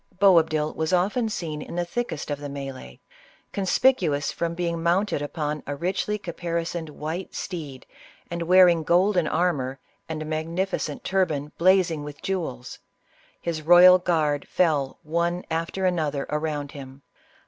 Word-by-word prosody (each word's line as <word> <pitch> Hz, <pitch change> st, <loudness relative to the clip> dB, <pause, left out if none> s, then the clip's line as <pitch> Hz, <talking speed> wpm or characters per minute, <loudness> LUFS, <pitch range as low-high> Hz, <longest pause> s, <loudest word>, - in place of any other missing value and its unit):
Boabdil 160 Hz, -6 st, +4 dB
was 160 Hz, +2 st, -1 dB
often 210 Hz, +6 st, +1 dB
seen 160 Hz, -7 st, -4 dB
in -, -, -8 dB
the 175 Hz, 0 st, -1 dB
thickest 175 Hz, -7 st, -4 dB
of 145 Hz, -, -2 dB
the 145 Hz, -, -8 dB
m&e'e, 140 Hz, -2 st, -7 dB, 0.5 s
conspicuous 190 Hz, -, +2 dB
from 170 Hz, 0 st, -3 dB
being 170 Hz, -1 st, -2 dB
mounted 175 Hz, -1 st, +1 dB
upon 150 Hz, 0 st, -3 dB
a 145 Hz, -, -3 dB
richly 190 Hz, +6 st, -1 dB
capari 170 Hz, -3 st, -3 dB
soned, 165 Hz, -2 st, -5 dB
white 160 Hz, +5 st, -6 dB
steed, 150 Hz, -8 st, -6 dB, 0.5 s
and 170 Hz, 0 st, -3 dB
wearing 175 Hz, -1 st, +6 dB
golden 175 Hz, +1 st, +3 dB
armor, 140 Hz, -8 st, 0 dB, 0.3 s
and 160 Hz, -1 st, -3 dB
a -, -, -8 dB
magnificent 165 Hz, +5 st, -2 dB
turban 155 Hz, -7 st, 0 dB
blazing 175 Hz, -4 st, +3 dB
with 145 Hz, 0 st, -8 dB
jewels. 165 Hz, -10 st, -4 dB, 0.6 s
His 165 Hz, -2 st, -3 dB
royal 175 Hz, +3 st, +8 dB
guard 155 Hz, -5 st, 0 dB
fell 150 Hz, -7 st, +1 dB
one 170 Hz, +3 st, -1 dB
after 165 Hz, +4 st, -2 dB
another 155 Hz, -6 st, 0 dB
around 150 Hz, -2 st, -2 dB
him. 135 Hz, -1 st, -11 dB
165 Hz, 140 wpm, -25 LUFS, 150-180 Hz, 0.6 s, royal